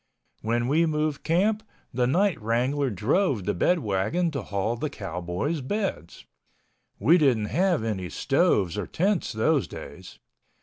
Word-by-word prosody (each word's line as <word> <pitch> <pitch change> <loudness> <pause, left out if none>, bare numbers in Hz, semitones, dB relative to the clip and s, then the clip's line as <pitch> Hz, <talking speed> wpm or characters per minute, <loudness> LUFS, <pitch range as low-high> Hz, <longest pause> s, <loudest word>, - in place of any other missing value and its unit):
When 120 +2 0
we 160 +5 +3
moved 155 -1 -1
camp, 205 +6 +2 0.3
the 125 0 +1
night 180 - +1
wrangler 125 +5 0
drove 120 - +1
the - - 0
bedwagon 145 - +1
to 140 -4 -3
haul 100 +2 -2
the 150 +5 -3
cowboys' 95 - -3
beds. 160 - -4 0.7
We 160 - +4
didn't 120 -8 +2
have 175 - +2
any 95 -5 -3
stoves 95 +2 +1
or - - -4
tents 190 - 0
those 130 +6 +1
days. - - -10
130 Hz, 135 wpm, -26 LUFS, 105-165 Hz, 0.7 s, We